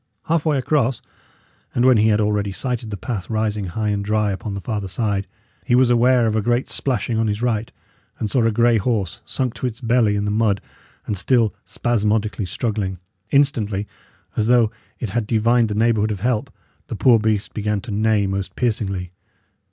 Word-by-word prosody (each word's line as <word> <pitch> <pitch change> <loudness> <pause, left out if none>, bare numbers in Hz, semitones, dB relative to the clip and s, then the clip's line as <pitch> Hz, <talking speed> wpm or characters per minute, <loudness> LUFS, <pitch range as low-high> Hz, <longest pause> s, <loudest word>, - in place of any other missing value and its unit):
Half 165 -1 0
way 150 -2 +3
across, 130 -3 +1 0.8
and 120 - +3
when 130 -2 +6
he 110 +1 +4
had 105 -1 +3
already 105 -1 0
sighted 120 +3 -3
the 100 - -4
path 100 -2 -5
rising 110 -2 -1
high 105 +4 -2
and 100 -1 -1
dry 105 0 +1
upon 100 +1 -4
the - - -3
farther 105 -1 -3
side, 100 0 -1 0.4
he 120 - +2
was 125 -1 +4
aware 120 0 +4
of 110 -1 +1
a 110 - +2
great 120 +4 0
splashing 115 -3 -1
on 115 - +1
his 105 +2 -2
right, 115 -2 0 0.5
and 110 - -2
saw 120 +3 +1
a 115 - +3
grey 115 +1 +3
horse, 100 -5 -1
sunk 130 -3 -1
to 130 - -3
its 115 -2 -6
belly 115 -3 +2
in 100 0 -1
the 105 - 0
mud, 105 -2 +2 0.5
and 100 -3 -2
still 115 -1 +2
spasmodically 110 -3 0
struggling. 100 -1 -2 0.3
Instantly, 110 -8 +1 0.5
as 110 - +1
though 120 -3 +4 0.3
it 115 -6 -4
had 115 -1 -1
divined 115 +1 +3
the 105 - -2
neighbourhood 110 -1 +2
of 100 -3 -4
help, 120 -1 0 0.4
the - - -5
poor 120 +1 +5
beast 110 -1 -1
began 105 -1 -1
to 110 - -8
neigh 105 0 +2
most 95 0 -3
piercingly. 100 -7 -1
110 Hz, 190 wpm, -21 LUFS, 105-120 Hz, 0.8 s, when